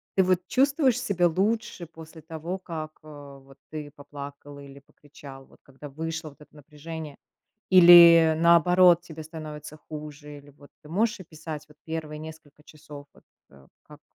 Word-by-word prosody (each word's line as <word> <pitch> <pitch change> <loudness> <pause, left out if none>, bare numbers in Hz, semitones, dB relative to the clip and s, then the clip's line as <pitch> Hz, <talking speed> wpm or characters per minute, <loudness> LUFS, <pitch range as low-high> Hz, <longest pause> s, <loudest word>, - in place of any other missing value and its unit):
Ты 190 - +4
вот 185 -1 +2
чувствуешь 270 - +2
себя 185 -8 +1
лучше 195 +2 -2
после 160 0 -14
того, 165 +3 -6
как, 160 -4 -8
а, 145 -2 -13
вот 135 0 -20
ты 150 -2 -8
поплакал 145 0 -11
или 140 0 -13
покричал, 140 -1 -15
вот - - -23
когда 140 +2 -13
вышло 160 +2 -6
вот 145 - -21
это 150 - -19
напряжение? 150 +1 -10 0.5
Или, 170 -3 +8
наоборот, 170 +1 +5
тебе 160 -2 -10
становится 155 -1 -10
хуже? 150 -1 -10
Или 145 0 -17
вот 145 0 -20
ты 150 - -15
можешь 215 +6 -1
описать 155 -3 -9
вот 150 - -20
первые 160 -2 -6
несколько 155 -1 -13
часов, 145 -2 -13
вот, - - -23 0.3
э, 70 -1 -20 0.2
как - - -17
155 Hz, 155 wpm, -25 LUFS, 145-170 Hz, 0.5 s, Или